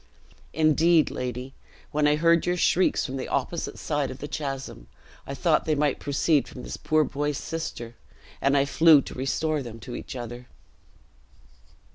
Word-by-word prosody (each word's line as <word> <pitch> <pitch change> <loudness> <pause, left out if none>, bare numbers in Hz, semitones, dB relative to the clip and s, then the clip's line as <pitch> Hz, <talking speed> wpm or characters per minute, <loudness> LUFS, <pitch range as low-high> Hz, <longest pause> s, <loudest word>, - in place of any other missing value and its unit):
Indeed, 160 0 +3
lady, 125 +1 -5 0.4
when 150 0 +2
I 150 - +4
heard 165 +2 +3
your 180 0 +1
shrieks 180 +1 +2
from 135 -1 -4
the 130 - -4
opposite 160 +5 -2
side 145 -3 -1
of 130 - -7
the 145 - -6
chasm, 135 - -5 0.4
I 140 - -5
thought 155 +3 +2
they 155 - +1
might 145 -1 0
proceed 145 +1 +1
from 125 - -10
this - - -6
poor 155 0 +2
boy's 145 0 -2
sister, 120 -9 -5 0.5
and 140 +1 +3
I 140 - +3
flew 155 0 +6
to - - -8
restore 150 +4 -1
them 115 -3 -8
to 125 +2 -7
each - - -7
other." 120 0 -7
145 Hz, 165 wpm, -26 LUFS, 130-155 Hz, 0.5 s, flew